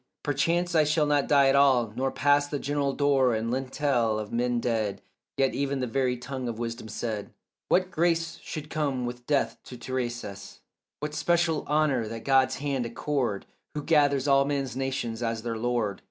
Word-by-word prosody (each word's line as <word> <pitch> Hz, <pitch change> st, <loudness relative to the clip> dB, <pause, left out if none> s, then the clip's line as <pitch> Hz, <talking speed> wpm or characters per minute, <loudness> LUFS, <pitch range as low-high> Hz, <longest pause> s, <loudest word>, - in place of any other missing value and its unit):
Perchance 170 Hz, +5 st, +1 dB
I 160 Hz, -2 st, +5 dB
shall 150 Hz, +1 st, +2 dB
not 145 Hz, -1 st, +2 dB
die 140 Hz, -2 st, +5 dB
at 135 Hz, -, +4 dB
all, 130 Hz, -6 st, +4 dB
nor 135 Hz, +2 st, 0 dB
pass 145 Hz, +1 st, +3 dB
The 145 Hz, -, -3 dB
general 140 Hz, 0 st, -1 dB
door 135 Hz, -4 st, +3 dB
and 115 Hz, +1 st, -2 dB
lintel 130 Hz, -3 st, 0 dB
of 105 Hz, -1 st, -5 dB
men 120 Hz, 0 st, +1 dB
dead; 110 Hz, -4 st, -1 dB, 0.3 s
Yet 135 Hz, -1 st, +2 dB
even 140 Hz, -1 st, -1 dB
the 130 Hz, -, 0 dB
very 125 Hz, 0 st, 0 dB
tongue 125 Hz, +1 st, -5 dB
of 115 Hz, -2 st, -4 dB
wisdom 115 Hz, -1 st, -5 dB
said 110 Hz, -1 st, -4 dB, 0.4 s
What 185 Hz, 0 st, +2 dB
grace 165 Hz, 0 st, 0 dB
should 155 Hz, 0 st, -7 dB
come 140 Hz, -5 st, -1 dB
with 120 Hz, 0 st, -7 dB
death 145 Hz, -2 st, +1 dB
to 125 Hz, -, -9 dB
Tiresias, 120 Hz, -5 st, -5 dB, 0.4 s
What 150 Hz, 0 st, -3 dB
special 170 Hz, -1 st, +1 dB
honour 145 Hz, -6 st, +2 dB
that 115 Hz, +1 st, -7 dB
God's 130 Hz, -1 st, +4 dB
hand 135 Hz, -3 st, -2 dB
accord 120 Hz, -4 st, -2 dB, 0.3 s
Who 150 Hz, -, -3 dB
gathers 145 Hz, -3 st, +3 dB
all 140 Hz, 0 st, +5 dB
men's 140 Hz, -3 st, -2 dB
nations 130 Hz, -4 st, -3 dB
as 115 Hz, -1 st, -2 dB
their 115 Hz, -1 st, -2 dB
lord. 115 Hz, -4 st, -1 dB
135 Hz, 180 wpm, -27 LUFS, 120-145 Hz, 0.4 s, I